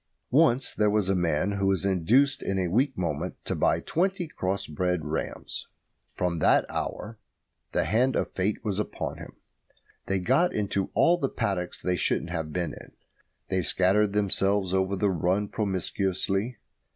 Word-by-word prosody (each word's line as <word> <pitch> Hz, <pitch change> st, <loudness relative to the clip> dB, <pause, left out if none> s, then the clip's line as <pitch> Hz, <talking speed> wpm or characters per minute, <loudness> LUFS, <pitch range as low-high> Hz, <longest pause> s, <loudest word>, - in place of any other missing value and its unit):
Once 135 Hz, -3 st, +3 dB
there 105 Hz, -1 st, +2 dB
was 105 Hz, -2 st, +1 dB
a 95 Hz, -, +3 dB
man 85 Hz, +1 st, +1 dB
who 100 Hz, -1 st, 0 dB
was 95 Hz, 0 st, +2 dB
induced 120 Hz, -, +3 dB
in 95 Hz, -, -1 dB
a 90 Hz, -2 st, 0 dB
weak 130 Hz, +4 st, +1 dB
moment 85 Hz, 0 st, -2 dB
to -, -, -1 dB
buy -, -, +2 dB
twenty 185 Hz, +1 st, -1 dB
cross 95 Hz, -8 st, -2 dB
bred 90 Hz, +1 st, -1 dB
rams. 75 Hz, +1 st, -4 dB, 0.5 s
From 90 Hz, -2 st, -1 dB
that -, -, +4 dB
hour 110 Hz, 0 st, -4 dB, 0.5 s
the -, -, +1 dB
hand 125 Hz, +4 st, +2 dB
of -, -, -1 dB
Fate 100 Hz, +4 st, -1 dB
was 105 Hz, -2 st, -1 dB
upon 105 Hz, -, -4 dB
him. -, -, -10 dB, 0.7 s
They 95 Hz, -, +1 dB
got 135 Hz, -, +2 dB
into 100 Hz, -2 st, -1 dB
all 175 Hz, +1 st, +4 dB
the 135 Hz, -, 0 dB
paddocks 90 Hz, -3 st, -3 dB
they 90 Hz, 0 st, 0 dB
shouldn't 85 Hz, -, 0 dB
have 80 Hz, -3 st, -3 dB
been 85 Hz, -2 st, -2 dB
in. -, -, -12 dB, 0.6 s
They 95 Hz, -1 st, +1 dB
scattered 100 Hz, +4 st, +2 dB
themselves 100 Hz, -2 st, +2 dB
over 95 Hz, +1 st, +1 dB
the 100 Hz, +1 st, +1 dB
run 95 Hz, +4 st, 0 dB
promiscuously. 95 Hz, +2 st, -1 dB
95 Hz, 165 wpm, -27 LUFS, 90-105 Hz, 0.7 s, that